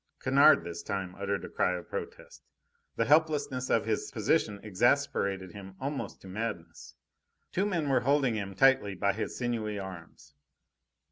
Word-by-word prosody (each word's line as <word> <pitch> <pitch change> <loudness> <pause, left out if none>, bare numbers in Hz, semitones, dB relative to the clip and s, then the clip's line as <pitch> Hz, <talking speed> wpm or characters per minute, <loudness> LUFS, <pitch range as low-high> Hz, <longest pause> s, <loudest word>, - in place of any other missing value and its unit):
Kennard 140 +3 +5
this 85 0 -6
time 95 -3 -4
uttered 100 +1 -3
a - - -6
cry 90 - +1
of 90 - -10
protest. - - -7 0.5
The 115 - +1
helplessness 145 -3 +2
of 115 - +2
his 110 -1 -1
position 100 -1 0
exasperated 100 -4 +1
him 95 -1 -10
almost 140 +1 -4
to - - -12
madness. 105 -3 -6 0.6
Two 195 +3 0
men 170 -7 -1
were 135 -2 +3
holding 135 -2 +2
him 100 -3 -4
tightly 130 -4 +4
by 100 +2 +1
his 110 - -4
sinewy 115 -4 -2
arms. 85 -7 -9
110 Hz, 150 wpm, -30 LUFS, 95-135 Hz, 0.6 s, Kennard